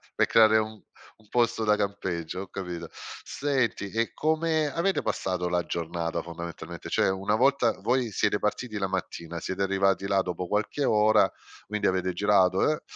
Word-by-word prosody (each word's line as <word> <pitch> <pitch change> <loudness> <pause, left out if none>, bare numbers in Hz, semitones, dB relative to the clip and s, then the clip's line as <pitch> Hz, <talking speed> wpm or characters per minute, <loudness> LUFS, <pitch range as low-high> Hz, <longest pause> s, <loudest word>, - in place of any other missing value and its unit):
pe' - - +3
creare 110 -1 +6
un 110 -1 -2 0.4
un 105 -2 -25
posto 120 -2 +1
da 105 -1 +3
campeggio, 95 -3 -3
ho 95 - -7
capito. 90 -4 -6 0.3
Senti, 130 -8 -1
e 115 +2 -1
come 155 -1 +1
avete 190 +3 +1
passato 90 -2 -2
la 90 0 0
giornata 85 0 -3
fondamentalmente? 85 0 -8
Cioè, - - +2
una 95 +3 0
volta 130 -2 +3
voi 120 +2 0
siete 105 - +1
partiti 110 +1 -2
la 95 -1 -1
mattina, 85 -3 -4
siete 95 +3 -4
arrivati 95 0 +1
là 95 -1 +3
dopo 90 0 -4
qualche 105 +9 -1
ora, 110 -2 +4 0.4
quindi 105 0 0
avete 95 0 0
girato, 95 +2 +3
eh, 155 - -1
100 Hz, 160 wpm, -27 LUFS, 90-115 Hz, 0.4 s, creare